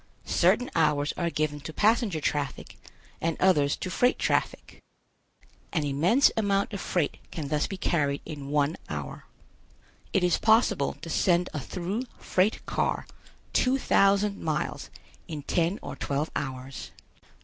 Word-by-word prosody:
Certain 250 - +2
hours 150 -2 +2
are 170 -1 -1
given 150 -2 -1
to 145 - -7
passenger 210 - +2
traffic 145 -2 -3 0.4
and 165 -1 0
others 150 -7 +3
to 185 - -5
freight 245 +7 +2
traffic. - - -1 0.9
An 160 -5 0
immense 165 - +4
amount 200 -1 +1
of 200 - -4
freight 170 -6 -1
can 150 -4 -5
thus 150 0 +1
be 195 - -5
carried 145 -6 0
in 145 -3 -7
one 145 +2 +1
hour. - - -6 0.9
It 195 - +2
is 180 -1 +3
possible 220 +2 +3
to - - -6
send 180 -1 +2
a 150 - -2
through 190 - -4
freight 190 +4 0
car - - -1 0.5
two 260 +1 +3
thousand 200 -4 +3
miles 155 -1 -2 0.4
in 150 -3 -6
ten 170 +6 +1
or - - -6
twelve 145 +3 -2
hours. 130 -1 -5
165 Hz, 140 wpm, -27 LUFS, 145-200 Hz, 0.9 s, immense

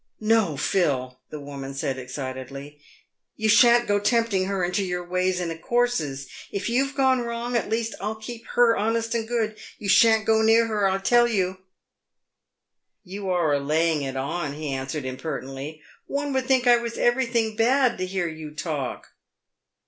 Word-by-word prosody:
"No, 215 -8 +2
Phil," 130 -8 0
the 150 - -7
woman 140 -1 -7
said, 135 -1 -2
excitedly, 130 +2 -7 0.5
"you 220 - -1
shan't 240 +2 +6
go 205 0 +2
tempting 210 -2 +1
her 195 -1 -1
into 180 +3 -1
your 180 -1 -3
ways 180 0 0
and 165 -2 -4
courses. 165 - 0 0.2
If 200 +2 -3
you've 270 +4 0
gone 265 -2 +3
wrong, 235 +1 -3
at 235 - 0
least 225 0 -1
I'll 210 +2 -2
keep 225 +2 -9
her 240 -1 +5
honest 225 +2 -1
and 225 -1 -2
good. 220 -2 -2 0.2
You 205 - -7
shan't 220 +1 +5
go 220 0 +3
near 225 +1 +5
her, 210 -3 +1
I 190 0 +1
tell 240 +5 +4
you." 190 -5 0 0.8
" - - -59
You 200 -1 -4
are 170 -5 +2
a 140 - +2
laying 155 +2 +1
it 135 -1 -4
on," 140 +2 -3
he 150 0 -5
answered 135 +2 -4
impertinently; 135 +2 -6
" - - -36
one 285 0 -2
would 260 -1 -1
think 260 -2 +3
I 240 -1 +6
was 235 0 -5
everything 235 -3 +1
bad 245 0 +2
to 185 - -2
hear 185 -2 -1
you 155 -1 -7
talk." 155 -5 -4
195 Hz, 175 wpm, -24 LUFS, 150-230 Hz, 0.8 s, shan't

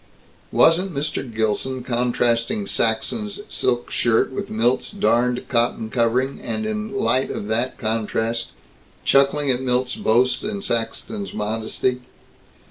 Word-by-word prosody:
Wasn't 175 +1 +4
Mr. 140 -3 -2
Gilson 115 +4 -1
contrasting 120 -3 0
Saxton's 115 - 0
silk 120 -1 0
shirt 115 +1 +2
with 130 - -4
Milt's 120 +4 +1
darned 125 - +1
cotton 115 -2 0
covering, 125 +3 +1
and 220 - -3
in 215 0 -3
light 200 -10 +1
of - - -4
that 120 +4 -1
contrast 115 +1 -1 0.6
chuckling 140 +1 +4
at 125 0 -1
Milt's 125 0 0
boast 125 +3 +2
and 205 -1 -3
Saxton's 120 - -3
modesty? 110 +4 -1
125 Hz, 120 wpm, -22 LUFS, 115-140 Hz, 0.6 s, Wasn't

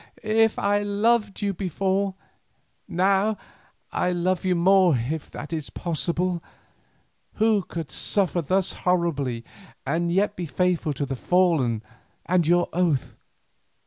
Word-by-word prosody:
if 220 0 +3
I 205 0 +1
loved 210 0 +1
you 200 -1 0
before, 195 +1 -1 0.7
now 195 +4 +2 0.5
I 180 - 0
love 180 +1 0
you 185 -1 +2
more 180 -3 +4
if 145 +7 -4
that 150 - -7
is 155 -3 -4
possible, 170 +1 -2 0.9
who 220 -1 +3
could 165 -4 -6
suffer 185 -3 0
thus 185 +5 +1
horribly 145 -10 -1 0.4
and 170 +4 0
yet 205 +3 +1
be 175 -2 -4
faithful 170 0 0
to 140 +1 -2
the 135 0 -4
fallen 145 -9 +2 0.4
and 175 -3 +2
your 175 +1 +3
oath. 165 -6 0
180 Hz, 125 wpm, -24 LUFS, 165-195 Hz, 0.9 s, more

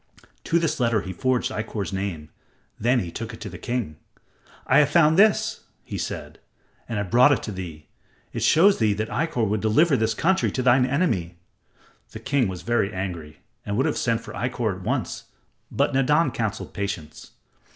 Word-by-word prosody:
To 165 - +2
this 165 -4 0
letter 115 -4 +2
he 95 - -6
forged 130 +6 0
Ikkor's 105 -2 -4
name; 95 -6 -4 0.5
then 120 +2 +2
he 85 - -6
took 115 +4 -6
it - - -17
to 105 - -6
the 90 - -9
king. 120 -11 -3 0.7
"I 130 - +5
have 145 -1 +4
found 155 0 +4
this," 205 +3 +3 0.2
he - - -6
said, - - -6 0.5
"and 115 - -2
have 100 -3 -3
brought 125 +4 +6
it 140 - +1
to 110 - -4
thee. 85 -6 -7 0.5
It - - -3
shows 195 +5 +5
thee 110 -3 +3
that 110 +2 -3
Ikkor 125 -6 0
would 105 0 -1
deliver 140 +8 +3
this 110 -2 0
country 190 - +1
to 130 - -1
thine 125 +1 +4
enemy." 115 - -1 0.8
The - - -7
king 130 -3 +1
was 90 -3 -6
very 115 -1 +1
angry 85 -6 -6 0.2
and 100 0 -3
would 130 - +2
have 155 - 0
sent 115 -1 0
for 115 -1 -10
Ikkor 120 -5 -2
at - - -11
once, - - -2 0.5
but - - +1
Nadan 145 +5 +3
counseled 110 -2 -4
patience. 100 -7 -6
115 Hz, 185 wpm, -24 LUFS, 100-130 Hz, 0.8 s, brought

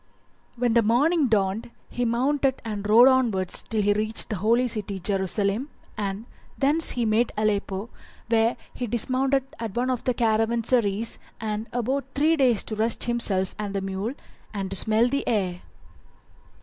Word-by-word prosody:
When 240 -1 +1
morning 255 +8 +3
dawned 210 0 0 0.2
he 245 - -2
mounted 265 +3 +1
and 210 -2 -4
rode 235 +4 +8
onward 230 -9 +2
till 215 -1 -2
he 205 +1 +3
reached 215 +2 -1
the 210 - -1
Holy 230 +6 +2
City, 205 -4 -2
[FN#377] - - -19
Jerusalem, 200 - 0 0.3
and 205 0 -4 0.3
thence 295 +4 +2
he 240 -2 0
made 220 +2 +2
Aleppo, 205 -1 -1 0.4
where 230 +1 +2 0.2
he 245 - -4
dismounted 260 +4 +1 0.2
at 225 -4 -5
one 250 +2 0
of 250 - -2
the 250 - +1
caravanserais 225 -1 +1 0.2
and 215 0 -3
abode 255 +3 -1
three 310 +3 +3
days 255 -8 +3
to 215 - -5
rest 225 +2 +1
himself 210 -6 -1
and 205 -1 -4
the 195 - -1
mule 195 +6 -3 0.4
and 195 -1 -3
to - - 0
smell 220 +4 +2
the 280 +2 -2
air. 185 -6 -1
225 Hz, 160 wpm, -25 LUFS, 205-245 Hz, 0.4 s, rode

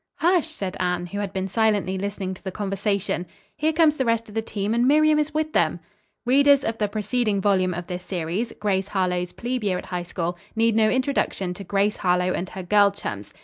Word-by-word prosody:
"Hush!" 345 -1 +2
said 195 - -5
Anne, 180 -1 0
who 200 +3 -5
had 200 -2 -3
been 190 -1 -2
silently 205 -2 +1
listening 195 -1 -3
to 185 - -13
the 190 - -3
conversation. 200 -2 -2 0.3
"Here 310 +1 +1
comes 310 -1 +3
the 265 - +1
rest 230 -1 0
of 210 - -12
the 225 - 0
team, 210 -1 -2
and 240 +2 +2
Miriam 305 +1 +5
is 300 0 0
with 310 0 -1
them." 170 +1 +2 0.5
Readers 280 +2 +5
of 225 0 -2
the 210 - +2
preceding 215 0 0
volume 185 -2 +2
of 175 +1 -5
this 180 +1 -5
series, 180 +5 -3
"GRACE 195 -2 0
HARLOWE'S 180 -3 -1
PLEBE 245 0 -3
YEAR 190 -3 +1
AT - - -7
HIGH 180 -1 -3
SCHOOL," 175 0 -3 0.2
need 225 0 +3
no 220 -1 +4
introduction 255 -8 0
to 200 - -9
Grace 200 +2 +1
Harlowe 180 0 +1
and 180 +1 -3
her 190 - -7
girl 205 +2 +5
chums. 105 - -6
205 Hz, 215 wpm, -24 LUFS, 185-230 Hz, 0.5 s, Miriam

